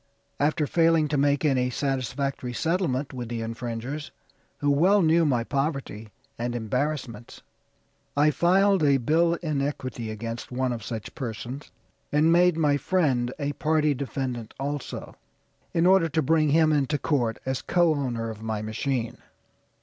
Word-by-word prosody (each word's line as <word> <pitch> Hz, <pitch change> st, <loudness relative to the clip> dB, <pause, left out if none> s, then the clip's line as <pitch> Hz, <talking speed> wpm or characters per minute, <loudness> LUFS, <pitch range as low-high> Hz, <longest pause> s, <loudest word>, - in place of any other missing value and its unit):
After 150 Hz, +1 st, +1 dB
failing 165 Hz, 0 st, +3 dB
to 150 Hz, -, 0 dB
make 145 Hz, +2 st, +2 dB
any 130 Hz, -3 st, +2 dB
satisfactory 135 Hz, 0 st, -2 dB
settlement 160 Hz, -3 st, -1 dB
with 120 Hz, -3 st, -5 dB
the 115 Hz, -1 st, -3 dB
infringers, 120 Hz, +5 st, -5 dB, 0.5 s
who 145 Hz, 0 st, +1 dB
well 185 Hz, +7 st, +4 dB
knew 165 Hz, 0 st, +4 dB
my 120 Hz, -4 st, +1 dB
poverty 135 Hz, -6 st, -3 dB, 0.3 s
and 120 Hz, +1 st, -2 dB
embarrassments, 120 Hz, 0 st, -3 dB, 0.7 s
I 150 Hz, +1 st, +5 dB
filed 185 Hz, +4 st, +3 dB
a 140 Hz, -2 st, +5 dB
bill 165 Hz, +7 st, +2 dB
in 150 Hz, -4 st, -1 dB
equity 130 Hz, -5 st, -4 dB
against 115 Hz, +3 st, -6 dB
one 125 Hz, 0 st, -1 dB
of 115 Hz, -2 st, -6 dB
such 110 Hz, -2 st, -6 dB
persons, 125 Hz, +3 st, -6 dB, 0.4 s
and 150 Hz, +3 st, +4 dB
made 175 Hz, 0 st, +4 dB
my 145 Hz, -3 st, +3 dB
friend 135 Hz, -7 st, +1 dB
a 145 Hz, -1 st, -2 dB
party 155 Hz, 0 st, +1 dB
defendant 130 Hz, -4 st, -4 dB
also, 145 Hz, 0 st, -5 dB, 0.6 s
in 165 Hz, 0 st, +2 dB
order 185 Hz, -3 st, +5 dB
to 160 Hz, +1 st, +1 dB
bring 155 Hz, +1 st, +3 dB
him 155 Hz, +1 st, +4 dB
into 145 Hz, 0 st, +1 dB
court 120 Hz, -7 st, 0 dB
as 130 Hz, -1 st, -2 dB
co 175 Hz, -3 st, +3 dB
owner 120 Hz, -6 st, -2 dB
of 110 Hz, -1 st, -10 dB
my 110 Hz, -1 st, -3 dB
machine. 115 Hz, +2 st, -2 dB
140 Hz, 150 wpm, -26 LUFS, 120-155 Hz, 0.7 s, I